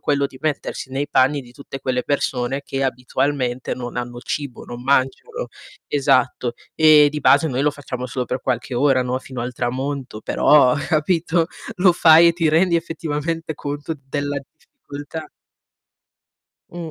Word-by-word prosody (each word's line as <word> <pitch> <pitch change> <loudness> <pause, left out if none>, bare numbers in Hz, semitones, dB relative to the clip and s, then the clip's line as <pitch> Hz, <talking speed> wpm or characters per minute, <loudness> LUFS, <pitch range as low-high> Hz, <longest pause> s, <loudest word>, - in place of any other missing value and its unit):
quello 140 -1 +1
di 135 -1 -15
mettersi 145 -3 -3
nei 140 +2 -2
panni 140 +3 +3
di 120 - -16
tutte 135 +1 -9
quelle 125 -1 -1
persone 135 -2 -1
che 135 -1 -3
abitualmente 130 0 -1
non 120 -1 -7
hanno 120 0 -4
cibo, 135 +1 -5
non 120 0 -8
mangiano 140 - 0 0.4
esatto, 130 -3 +1 0.2
ehm, 155 -2 +7
di 150 +1 -4
base 145 +3 +5
noi 130 -1 -1
lo 150 - +3
facciamo 125 -3 -6
solo 125 0 -3
per 125 +2 -3
qualche 125 0 -2
ora, 130 0 +3
no, 125 +1 -2
fino 130 -1 -8
al 125 - -4
tramonto, 130 -1 -3
però 135 +1 +4
capito, 165 +1 +1 0.3
lo 185 0 +5
fai 165 0 +7
e - - +3
ti 165 -2 +1
rendi 170 +3 +3
effettivamente 165 -1 -3
conto 145 +3 -5
della 145 0 -2
difficoltà. 145 +2 -10 1.4
Mh. 170 -2 -7
140 Hz, 155 wpm, -21 LUFS, 130-155 Hz, 1.4 s, ehm